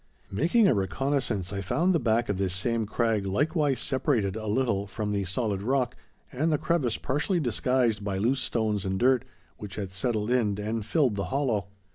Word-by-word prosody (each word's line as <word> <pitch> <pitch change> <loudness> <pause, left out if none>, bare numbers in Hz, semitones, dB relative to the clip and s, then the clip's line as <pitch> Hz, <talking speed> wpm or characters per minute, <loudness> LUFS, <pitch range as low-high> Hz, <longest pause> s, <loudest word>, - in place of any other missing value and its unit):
Making 175 - +3
a - - +4
reconnaissance, 105 -1 -1
I 100 - -2
found 170 - +1
the 165 - +3
back 120 -1 +1
of 100 -2 -2
this 95 -2 0
same 115 +3 0
crag 110 -3 0
likewise 145 - +1
separated 125 - +1
a 110 -1 -5
little 105 -3 0
from 105 +1 -3
the 100 -1 -1
solid 100 +1 -1
rock, 125 +2 0 0.4
and 155 +6 0
the 150 - +3
crevice 145 -8 0
partially 150 +7 0
disguised 120 -5 +1
by 100 -2 -2
loose 125 +7 +1
stones 110 -4 -1
and 95 0 -1
dirt, 130 -1 +3 0.3
which 100 -2 -8
had 100 -3 -4
settled 110 +2 -1
in 105 -5 +1
and 110 +1 -2
filled 130 +1 +2
the 100 - -1
hollow. 110 -2 0
115 Hz, 185 wpm, -27 LUFS, 100-130 Hz, 0.4 s, a